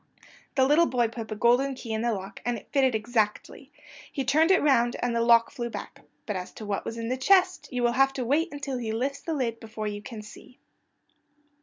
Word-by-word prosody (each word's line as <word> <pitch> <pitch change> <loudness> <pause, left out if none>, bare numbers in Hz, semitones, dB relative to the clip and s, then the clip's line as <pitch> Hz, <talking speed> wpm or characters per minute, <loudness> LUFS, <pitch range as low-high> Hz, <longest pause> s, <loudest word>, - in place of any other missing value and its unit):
The 265 -2 +4
little 310 +5 +4
boy 240 -3 +1
put 230 -1 -7
the 215 - -5
golden 245 +5 +3
key 235 -3 -6
in 220 - -1
the 235 0 +1
lock 195 0 -6
and 240 -1 -1
it 205 - -14
fitted 265 -4 +3
exactly. 220 -1 -2 0.4
He 270 - -3
turned 310 +6 +3
it 380 - +5
round 240 -5 +3
and 240 -1 -1
the 230 - +2
lock 230 0 +5
flew 240 -4 -4
back. - - -8 0.2
But 210 - -3
as 185 -1 -5
to 215 - -9
what 205 -1 -3
was 230 - -5
in 230 0 -4
the 255 - -1
chest 370 +6 +3
you 250 -1 -2
will 240 - +3
have 270 +2 +3
to 255 -2 -3
wait 315 +8 +1
until 275 -3 -4
he 225 -2 -3
lifts 275 +5 -2
the 325 +1 -3
lid 235 -5 -2
before 220 -1 -7
you 205 -1 -4
can 215 0 -8
see. 215 +4 -14
240 Hz, 230 wpm, -27 LUFS, 225-270 Hz, 0.4 s, it